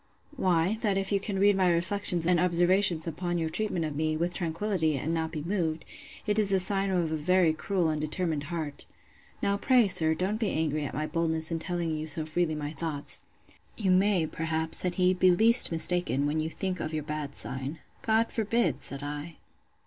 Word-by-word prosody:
Why, 185 - +1
that 205 -4 0
if 195 0 -2
you 200 - +2
can 200 0 -4
read 200 +1 +4
my 185 -2 +2
reflections 175 0 +1
and 175 0 +2
observations 175 -1 +2
upon 175 +1 -3
your 165 -1 -2
treatment 180 -2 -1
of 150 -2 -5
me, 155 +1 -1
with 170 +2 -2
tranquillity, 165 -2 -1
and 155 +5 -3
not 160 -1 -2
be 155 -3 -5
moved, 165 -3 -2 0.4
it 210 0 +1
is 205 -2 +3
a 195 - +4
sign 195 +1 0
of 175 -4 -1
a - - -1
very 170 +1 +2
cruel 175 +1 -1
and 155 -1 -2
determined 155 -1 -1
heart. 155 -3 -6 0.6
Now, 200 0 +1
pray, 245 0 +3
sir, 160 -4 +2
don't 195 +6 -2
be 220 -4 0
angry 155 -2 -1
at - - -6
my 155 +2 -2
boldness 160 0 -1
in 165 - -2
telling 170 -2 -3
you 155 +1 -5
so 155 +1 -1
freely 155 0 -1
my 150 -1 -5
thoughts. 155 -3 -3 0.6
You 195 -4 0
may, 185 -2 +3
perhaps, 160 0 0
said 180 -1 +1
he, 185 0 +3
be 185 0 +3
least 225 +6 +7
mistaken, 165 -4 +2
when 150 +2 -1
you 155 +1 -2
think 185 +1 -4
of 155 0 -4
your 155 - -3
bad 150 -1 -5
sign. 135 +4 -3 0.2
God 225 +1 +1
forbid! 215 - 0
said 140 0 -5
I. 145 +3 -6
170 Hz, 200 wpm, -28 LUFS, 155-190 Hz, 0.6 s, least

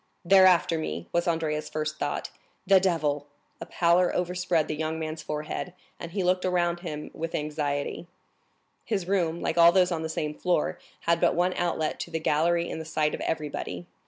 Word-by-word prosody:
"They're 190 +1 +7
after 170 -2 +3
me!" 85 - -4
was 170 +1 0
Andrea's 160 -2 -1
first 155 0 -3
thought. 145 - -2 0.4
"Diable!" 165 -7 +2 0.3
A - - -6
pallor 175 +1 +3
overspread 180 -2 0
the 155 - -2
young 160 +1 -2
man's 155 0 -4
forehead, 150 +4 -4 0.3
and 170 - -6
he 190 +1 -1
looked 180 0 +2
around 175 -1 +1
him 150 -4 -6
with 165 +1 -4
anxiety. 150 +1 -2 0.8
His 195 -6 -2
room, 175 -4 0
like 165 - 0
all 170 0 +9
those 180 0 +3
on 165 -2 -1
the 160 - -3
same 150 -1 -2
floor, 175 0 0 0.2
had 170 0 +1
but 175 - +3
one 180 +2 +2
outlet 165 -3 -1
to - - -5
the 165 -1 -2
gallery 170 +3 +1
in - - -5
the - - -5
sight 155 -1 0
of - - -4
everybody. 155 +2 -3
165 Hz, 185 wpm, -27 LUFS, 155-180 Hz, 0.8 s, all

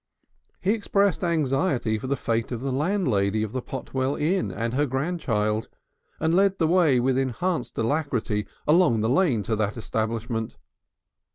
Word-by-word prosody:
He 190 - +2
expressed 200 -3 +1
anxiety 135 -8 +1
for 130 - -6
the 140 - +1
fate 115 -3 -2
of 120 -2 -3
the 135 0 -2
landlady 125 - +1
of 110 - -4
the 130 +1 -3
Potwell 130 +1 -3
Inn 180 +6 0
and 115 +1 -3
her 145 +3 +1
grandchild, 120 -7 -1 0.5
and 160 +1 +1
led 195 +1 +3
the 165 - +2
way 165 -7 +4
with 130 +1 +2
enhanced 135 +7 -2
alacrity 115 -5 -1 0.2
along 150 -8 +4
the 110 - +1
lane 135 - +2
to 110 +3 -1
that 105 +1 -1
establishment. 110 +1 -3
130 Hz, 155 wpm, -25 LUFS, 115-165 Hz, 0.5 s, way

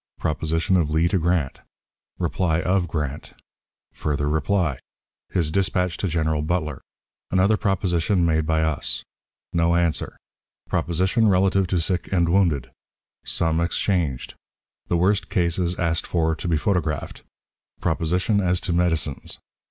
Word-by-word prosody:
Proposition 80 +5 0
of 80 -4 +1
Lee 80 +2 +2
to 95 - +1
Grant. 85 -4 0 0.6
Reply 85 -3 0
of 90 +1 +1
Grant. 75 -3 -4 0.6
Further 75 -1 -1
Reply. 75 -1 0 0.5
His 80 -4 0
Dispatch 90 -2 +1
to 100 - -1
General 80 -2 0
Butler. 80 -3 -2 0.5
Another 95 +4 +3
Proposition 95 -3 +1
made 80 -1 +1
by 80 -1 +2
us. 80 -2 -1 0.5
No 85 0 +2
Answer. 85 -2 0 0.5
Proposition 95 +7 +1
relative 95 0 +3
to 90 -1 0
Sick 90 +2 -1
and 85 -3 +2
Wounded. 80 -9 +2 0.5
Some 80 0 0
exchanged. 85 -5 -1 0.5
The 85 - +1
Worst 95 +3 +1
Cases 85 0 0
asked 85 -2 0
for 80 -2 +1
to 85 +3 -5
be 80 -2 +2
photographed. 75 -5 -1 0.6
Proposition 90 +6 +1
as 90 -1 +2
to 90 - -1
Medicines. 80 -5 0
85 Hz, 130 wpm, -23 LUFS, 80-90 Hz, 0.6 s, Another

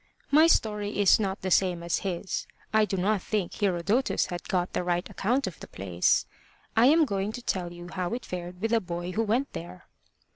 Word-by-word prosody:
My 310 +3 +7
story 210 -8 +1
is 200 +1 +6
not 195 -3 -2
the 185 - -2
same 180 -2 +2
as 170 - 0
his. 190 0 -3 0.3
I 215 0 +5
do 195 - -3
not 200 +2 +1
think 205 -4 -2
Herodotus 200 +5 +1
had 175 -1 -6
got 180 -1 0
the - - -1
right 175 0 -1
account 245 +7 0
of 185 -4 -6
the - - -9
place. 90 -2 +1 0.5
I 230 +3 +6
am 315 +3 +5
going 200 -3 -2
to 245 - -6
tell 180 -5 -2
you 175 0 -9
how 180 +4 -3
it 250 - -7
fared 180 0 -6
with 225 +1 0
a 230 - +4
boy 175 0 -4
who 215 - 0
went 230 +6 0
there. 85 +2 -8
190 Hz, 210 wpm, -27 LUFS, 175-220 Hz, 0.5 s, My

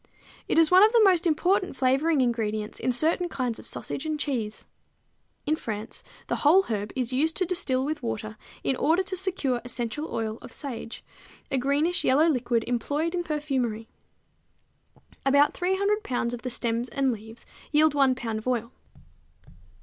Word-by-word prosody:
It - - 0
is 325 0 +5
one 370 +1 +8
of 435 - +6
the 460 -2 +6
most 365 -3 +4
important 365 +3 +1
flavoring 270 +4 +2
ingredients 220 -3 -1
in 255 - 0
certain 325 +7 +1
kinds 250 -6 -2
of - - -7
sausage - - -4
and 310 -1 -2
cheese. 235 -8 -3 0.8
In 310 - +2
France 220 -6 -6 0.2
the - - -2
whole 340 +7 +5
herb 210 - -3
is 255 -1 -1
used 315 +5 +1
to 370 - +2
distill 270 -7 +1
with 300 +1 -3
water 215 -2 -4 0.3
in 265 - +1
order 330 +5 +2
to 380 0 -3
secure 355 -10 -1
essential 245 +5 -4
oil 220 0 -3
of - - -11
sage, 240 -5 -6 0.5
a 270 - +1
greenish 290 +7 +1
yellow 295 +5 +4
liquid 240 -6 +1
employed 290 +7 -1
in 350 -1 -1
perfumery. 265 -8 -2 1.3
About 280 +2 +4
300 395 +3 0
pounds 245 - -2
of 240 - -5
the 255 - -4
stems 235 0 -2
and 270 -2 +1
leaves 225 +1 -10 0.3
yield 305 0 +4
one 270 -3 +3
pound 225 -3 -3
of 220 - -10
oil. 235 -1 -1
270 Hz, 165 wpm, -26 LUFS, 235-320 Hz, 1.3 s, one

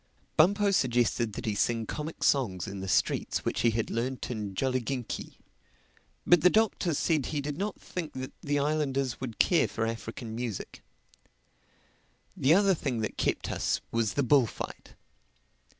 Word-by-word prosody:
Bumpo 200 +5 +4
suggested 120 - +1
that - - -5
he 110 - 0
sing 115 +2 0
comic 155 +7 -5
songs 100 - +2
in 100 0 -6
the 95 - -5
streets - - +1
which - - 0
he 120 - +4
had 115 0 -1
learned 125 +3 -2
in 105 -4 -4
Jolliginki. 130 0 -2 0.9
But 175 -2 +6
the 180 - +7
Doctor 200 -6 +2
said 155 -2 +1
he 150 - -2
did 145 0 -3
not 200 +6 -3
think 170 -4 -6
that 130 +1 -5
the 145 0 0
islanders 140 -4 0
would 120 -5 -5
care 175 - +4
for 115 - -2
African 115 0 -5
music. 115 -5 -5 1.5
The 145 +5 +4
other 200 0 +5
thing 130 -8 -2
that 110 - -3
kept - - -1
us - - 0
was 115 -2 0
the 145 - +2
bullfight. 130 -3 0
130 Hz, 155 wpm, -29 LUFS, 115-155 Hz, 1.5 s, the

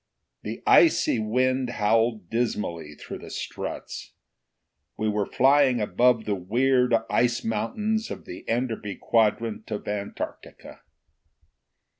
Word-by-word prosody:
The - - -6
icy 320 - +5
wind 130 +4 +1
howled 110 -2 +1
dismally 85 -10 -2
through - - -8
the - - -10
struts. - - -6 0.8
We 110 - -1
were 105 -1 0
flying 135 -2 +4
above 115 +2 +2
the 105 - 0
weird 125 +6 +2
ice 120 0 +1
mountains 210 - -1
of - - -7
the 90 - -9
Enderby 115 -4 -2
quadrant 110 0 0
of 105 -2 -5
Antarctica. 100 -1 -6
115 Hz, 110 wpm, -25 LUFS, 105-125 Hz, 0.8 s, icy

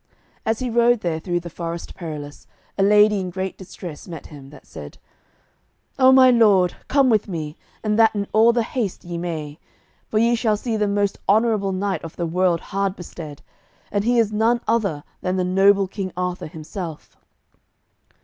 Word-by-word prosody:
As 225 0 +1
he 255 +1 -3
rode 235 0 +3
there 165 -2 -1
through 175 +1 -2
the 170 - -8
Forest 170 0 -6
Perilous, 150 -4 -8 0.3
a - - -1
lady 210 +1 +5
in 185 -1 -3
great 190 +1 -4
distress 180 -4 -9
met 165 -4 -8
him, 140 -3 -12
that 145 -1 -15
said: 75 -2 -10 1.0
"O 260 0 +7
my 260 -1 +7
lord, 205 -7 +4
come 275 -1 +3
with 220 -4 +2
me, 155 -5 -5 0.3
and 215 0 0
that 225 -1 +5
in 200 -1 -1
all 225 +2 +6
the 235 -1 +1
haste 220 -5 -3
ye 175 -1 -5
may, 155 -3 -5 0.5
for 215 - -2
ye 230 +2 +3
shall 225 -2 +1
see 230 +1 -3
the 210 -1 +1
most 200 0 0
honourable 215 -2 +3
knight 190 +1 -2
of 165 - -8
the 175 - -2
world 175 0 +1
hard 195 -1 0
bestead, 160 -4 -9 0.5
and 205 0 0
he 240 +2 +2
is 225 -2 +3
none 225 +3 +2
other 200 -10 0 0.2
than 185 0 -1
the 185 - 0
noble 195 +2 +4
King 190 -1 -5
Arthur 180 -2 -3
himself." 160 +1 -8
195 Hz, 180 wpm, -22 LUFS, 170-220 Hz, 1.0 s, O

